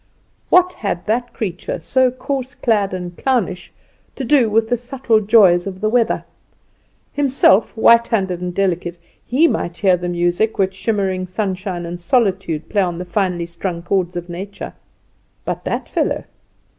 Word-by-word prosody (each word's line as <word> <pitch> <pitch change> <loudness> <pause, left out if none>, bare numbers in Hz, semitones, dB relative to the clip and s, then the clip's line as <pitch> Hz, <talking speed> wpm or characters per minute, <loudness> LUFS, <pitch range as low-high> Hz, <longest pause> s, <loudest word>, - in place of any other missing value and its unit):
What 365 0 +5
had 195 - -3
that 240 +3 -1
creature, 185 -4 -4
so 255 +11 +2
coarse 260 +1 -4
clad 210 -5 +1
and 180 -1 -5
clownish, 210 -9 -1 0.4
to 270 - -5
do 255 -3 +3
with 220 +1 +2
the 245 - +2
subtle 245 -1 0
joys 200 -4 +5
of 190 -1 -6
the 215 +1 0
weather? 240 -1 +1 0.9
Himself, 260 -7 +3
white 235 +1 +5
handed 190 -6 -1
and 180 0 -3
delicate, 175 -2 -1 0.3
he 285 +8 +3
might 175 - -2
hear 190 -3 +4
the 175 0 -4
music 175 +5 0
with 190 -1 +1
shimmering 190 -3 -1
sunshine 185 -2 -3
and 175 +1 -6
solitude 190 - 0
play 205 - +1
on 175 -3 -1
the 180 - -5
finely 175 -1 -1
strung 170 0 -5
chords 180 -1 -1
of 175 0 -5
nature; 190 +3 -7 0.7
but - - -3
that - - -2
fellow! - - -1
195 Hz, 155 wpm, -19 LUFS, 175-230 Hz, 0.9 s, What